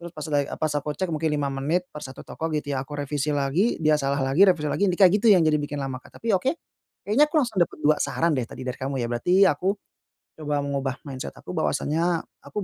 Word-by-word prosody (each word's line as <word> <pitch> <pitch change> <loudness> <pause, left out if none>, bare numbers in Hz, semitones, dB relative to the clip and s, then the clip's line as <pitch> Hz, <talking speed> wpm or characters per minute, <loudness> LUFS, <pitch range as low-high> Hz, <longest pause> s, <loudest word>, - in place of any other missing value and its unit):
terus 170 0 -8
pas 150 - -5
lagi, 145 -1 +1
eee, - - -5
pas 155 -1 0
aku 145 0 -2
cek 185 -3 -2
mungkin 160 +1 0
5 145 -2 -1
menit 155 +7 -1
per 150 - -8
1 130 -2 -9
toko 160 - -4
gitu 145 -1 -3
ya. 130 - -1
Aku 145 +2 -7
revisi 145 0 -2
lagi, 145 - +1
dia 150 -1 +4
salah 140 0 0
lagi, 165 +9 +5
revisi 170 -5 +2
lagi, 195 +7 +1
yang 185 - +1
di - - -27
kayak 185 -2 +7
gitu 230 - +3
yang 185 -5 +6
jadi 150 -1 +2
bikin 145 0 -4
lama, 135 -2 -4
Kak, - - -17
tapi 230 -1 -1
oke. 260 - +1 0.5
Kayaknya 230 +9 +4
aku 325 - -24
langsung 240 -9 +1
dapat 170 - +1
2 150 0 +5
saran 165 0 +1
deh 130 -4 0
tadi 130 - -8
dari 125 +1 -4
kamu 135 +1 -3
ya. 120 - -1
Berarti 180 +11 +4
aku 190 +3 +1 0.7
coba 145 -1 -1
mengubah 140 -2 -2
mindset 130 - -6
aku - - -9
bahwasanya 165 +2 0 0.2
aku 210 - -5
150 Hz, 250 wpm, -25 LUFS, 140-180 Hz, 0.7 s, kayak